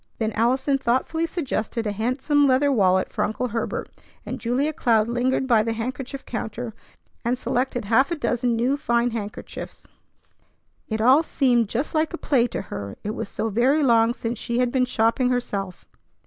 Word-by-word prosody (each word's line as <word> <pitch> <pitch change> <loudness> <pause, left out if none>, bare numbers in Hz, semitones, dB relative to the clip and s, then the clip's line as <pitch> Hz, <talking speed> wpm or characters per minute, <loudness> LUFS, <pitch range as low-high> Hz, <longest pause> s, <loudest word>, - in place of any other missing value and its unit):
Then 220 -1 -1
Allison 260 +5 +1
thoughtfully 265 +7 0
suggested 255 -9 -3
a 210 - 0
handsome 265 +7 +1
leather 270 +2 +3
wallet 190 -6 +2
for - - -1
Uncle 230 +4 -2
Herbert, 230 +1 -3 0.4
and - - -5
Julia 260 +6 0
Cloud 225 -6 +2
lingered 250 +2 0
by 235 -4 +4
the 225 +1 -1
handkerchief 255 +4 -5
counter, 225 0 -5 0.5
and 245 +1 0
selected 245 -2 -1
half 235 +6 +3
a 340 - -1
dozen 245 -5 0
new 250 +5 +1
fine 235 -4 +1
handkerchiefs. 210 -2 -7 1.0
It 220 -1 -1
all 260 +6 +6
seemed 245 -8 +2
just 255 +7 -2
like 315 +1 +1
a - - -8
play 255 -7 +2
to - - -4
her, 100 -1 -6
it 210 - -2
was 200 - -5
so 225 - -2
very 260 +8 +2
long 230 -3 +4
since 230 0 -4
she 235 - -2
had 250 -1 +2
been 255 -1 +2
shopping 240 +1 +1
herself. 200 -7 -3
245 Hz, 175 wpm, -24 LUFS, 225-265 Hz, 1.0 s, all